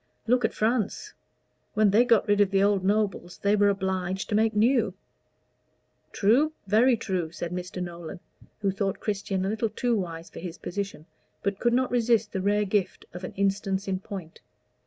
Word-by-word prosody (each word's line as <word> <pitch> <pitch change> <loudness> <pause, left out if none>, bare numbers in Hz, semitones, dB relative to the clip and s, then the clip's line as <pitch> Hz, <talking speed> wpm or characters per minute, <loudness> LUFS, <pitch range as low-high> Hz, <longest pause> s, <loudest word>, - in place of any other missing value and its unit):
Look 245 +1 +2
at - - 0
France. 235 - -1 0.6
When 210 -1 +4
they 225 +5 +5
got 230 -4 +3
rid 205 0 +3
of 200 - +4
the 195 0 +2
old 200 -2 +2
nobles 200 -3 0
they 200 +1 +2
were 205 -1 +4
obliged 190 -1 -2
to - - -2
make 220 0 +2
new." 225 -3 +3 1.2
"True, 260 +10 +3
very 230 +5 +4
true," 185 -7 -2
said 170 0 -5
Mr. 180 0 -4
Nolan, 170 +1 -7 0.4
who 200 -1 +1
thought 195 0 -2
Christian 195 -2 -2
a - - 0
little 220 +1 -1
too 240 +1 0
wise 170 -4 -5
for - - -9
his 175 -1 -7
position, 195 -4 -5 0.4
but 200 -1 -1
could 240 -1 +2
not 255 +1 +1
resist 235 -2 +2
the 190 - -1
rare 205 +2 +2
gift 200 -1 -1
of 180 +1 -8
an - - -6
instance 195 0 -1
in 190 -1 -1
point. 190 -5 -8
200 Hz, 180 wpm, -27 LUFS, 190-220 Hz, 1.2 s, they